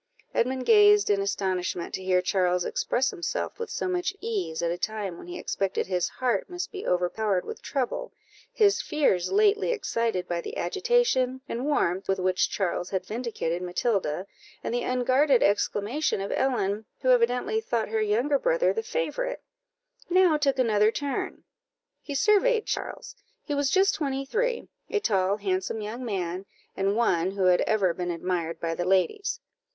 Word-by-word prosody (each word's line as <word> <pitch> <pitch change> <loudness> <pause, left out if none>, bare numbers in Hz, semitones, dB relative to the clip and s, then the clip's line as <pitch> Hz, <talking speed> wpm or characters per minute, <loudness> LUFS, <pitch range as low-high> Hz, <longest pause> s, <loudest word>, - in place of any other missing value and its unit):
Edmund 255 +1 0
gazed 415 - +6
in 200 -1 +2
astonishment 185 -3 -2
to 190 - -4
hear 185 -1 +2
Charles 180 -1 +1
express 265 +2 0
himself 370 +4 -4
with 465 -1 -4
so - - -2
much 365 +1 -1
ease, 405 - -3
at 170 - +1
a 175 - -2
time 210 -5 -3
when 175 - -11
he 355 0 -6
expected 195 -1 -2
his 180 -2 0
heart 255 +5 -1
must 355 0 -5
be 390 -2 -6
overpowered 180 +2 0
with 445 - -7
trouble; 265 -4 -3 0.4
his 425 -5 +3
fears 235 - +1
lately 420 +2 +3
excited 230 - -1
by 170 -1 -2
the - - -7
agitation 260 - +1
and 245 +4 -3
warmth 190 -10 0
with 195 - +1
which 185 +2 +1
Charles 180 -2 -2
had 190 -1 -2
vindicated 215 -6 -3
Matilda, 180 -2 -1 0.4
and - - -3
the 245 - 0
unguarded 255 +2 +3
exclamation 205 +6 +1
of 195 - -4
Ellen, 220 -5 0 0.2
who 260 - +1
evidently 250 - +2
thought 235 - -1
her 220 0 0
younger 240 +7 +2
brother - - +2
the 450 - -1
favourite, - - -3 0.7
now 365 -2 +5
took 280 -3 +1
another 215 -4 +3
turn; 285 +2 -3 0.6
he 285 - -6
surveyed 430 - +3
Charles; - - -5 0.3
he 295 - -3
was 285 -1 +1
just 385 +5 +4
twenty 275 -3 -2
three 480 - -1 0.2
a 425 - +1
tall, 195 - +1
handsome 190 +1 -2
young 215 +4 -5
man, 190 -4 -3 0.3
and 195 +1 0
one 185 -7 +2
who 195 0 -2
had 180 -1 +4
ever 195 -5 +2
been 180 +1 -4
admired 170 -1 -2
by 165 -1 -2
the 175 +1 -2
ladies. 405 - +1
230 Hz, 165 wpm, -27 LUFS, -, 0.7 s, gazed